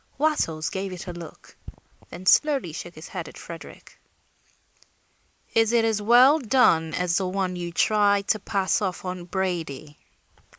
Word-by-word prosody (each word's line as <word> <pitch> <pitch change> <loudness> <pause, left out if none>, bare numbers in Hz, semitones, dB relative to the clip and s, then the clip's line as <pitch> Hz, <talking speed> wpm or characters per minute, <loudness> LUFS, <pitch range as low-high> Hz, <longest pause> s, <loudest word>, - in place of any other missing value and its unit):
Wattles 270 - 0
gave 190 0 -4
it 180 - -8
a 180 - -6
look, 170 -2 -12 0.5
then 185 - -10
slowly 270 - +3
shook 175 +2 -8
his 155 - -11
head 180 -4 -6
at - - -12
Frederick. 165 -1 -11 1.5
"Is 225 0 +3
it 230 -1 +3
as 220 -2 0
well 250 +8 +6
done 220 - +2
as 180 -1 0
the 190 - -1
one 185 -1 -2
you 175 -1 -5
tried 205 +1 +2
to 215 - +2
pass 200 0 0
off 190 -2 -3
on 180 -1 -5
Brady?" 165 -6 -4
190 Hz, 155 wpm, -24 LUFS, 175-220 Hz, 1.5 s, well